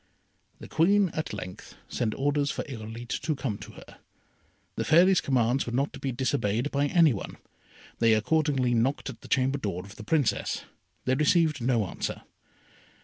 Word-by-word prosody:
The - - -9
Queen 195 +4 +3
at 155 -1 -4
length 90 -3 -8
sent 110 -3 -2
orders 145 +1 +1
for - - -3
Irolite 115 -4 -6
to 155 - -1
come 125 -6 -3
to - - -10
her. - - -14 0.8
The - - -1
Fairy's 180 +4 +5
commands 125 0 +1
were 120 - -4
not 140 +3 0
to - - -8
be 135 - -2
disobeyed 125 -1 0
by 140 +1 +1
any 160 -2 +5
one. 100 - -6 0.6
They 115 -1 +5
accordingly 135 +1 +1
knocked 130 +4 0
at 115 - -15
the - - -12
chamber 135 +1 +1
door 95 -6 -4
of 100 +1 -13
the 110 - -8
Princess. 145 +2 0 0.4
They 130 - +2
received 150 0 +2
no 120 -3 +2
answer. - - -5
130 Hz, 170 wpm, -27 LUFS, 115-150 Hz, 0.8 s, Fairy's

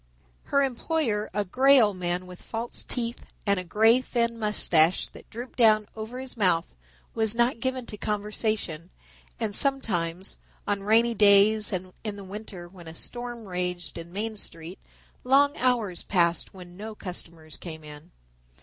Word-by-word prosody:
Her 280 0 +3
employer, 250 -4 0
a 205 +1 -1
grey 270 +8 +6
old 210 -4 +4
man 180 0 -2
with 180 0 -11
false 230 +1 -5
teeth 235 -1 -3 0.2
and 200 -2 +2
a - - -2
thin 180 - -12
grey 225 +7 +5 0.3
mustache 185 -6 +3
that - - -15
drooped 245 +3 -8
down 215 -2 +6
over 220 +3 -6
his 260 -1 -5
mouth, 180 - +1 0.4
was 220 -1 0
not 235 +1 +2
given 260 0 -2
to 210 - -7
conversation, 210 -5 -2 0.5
and 220 -3 -1
sometimes, 190 -10 +1 0.3
on 205 -1 0
rainy 225 +3 +4
days 210 0 +5
and 185 -1 -4
in 210 -2 -3
the 200 - -9
winter 195 -2 -8
when 175 -2 -14
a 160 - -8
storm 240 +3 -6
raged 180 -2 -3
in 170 0 -8
Main 215 +3 -3
Street, 165 -1 -7 0.4
long 280 +3 +4
hours 235 -8 +1
passed 170 -3 +1
when 180 -2 -12
no 215 +3 -7
customers 165 -5 -7
came 160 -3 -8
in. 150 0 -11
210 Hz, 160 wpm, -27 LUFS, 180-230 Hz, 0.5 s, grey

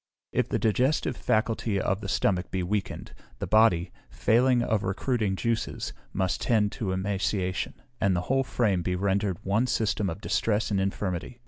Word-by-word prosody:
If - - 0
the - - +1
digestive 130 +4 +1
faculty 110 -2 0
of 95 +2 0
the 100 - -5
stomach 90 -2 +1
be 95 -1 -2
weakened, 100 +2 -3 0.2
the - - -3
body, 110 -5 +4 0.2
failing 120 +2 +3
of 110 -3 +1
recruiting 100 +1 0
juices, 115 +3 -2 0.2
must 95 -2 -1
tend 105 -3 +2
to 100 -5 -3
emaciation, 95 -1 -1 0.2
and 100 -2 +2
the 90 - 0
whole 135 +8 +1
frame 105 -8 +1
be 90 +1 -1
rendered 100 0 0
one 105 +6 +1
system 110 -4 0
of 85 +3 -5
distress 110 0 0
and 100 -2 +2
infirmity. 95 +3 -3
100 Hz, 160 wpm, -27 LUFS, 95-115 Hz, 0.2 s, body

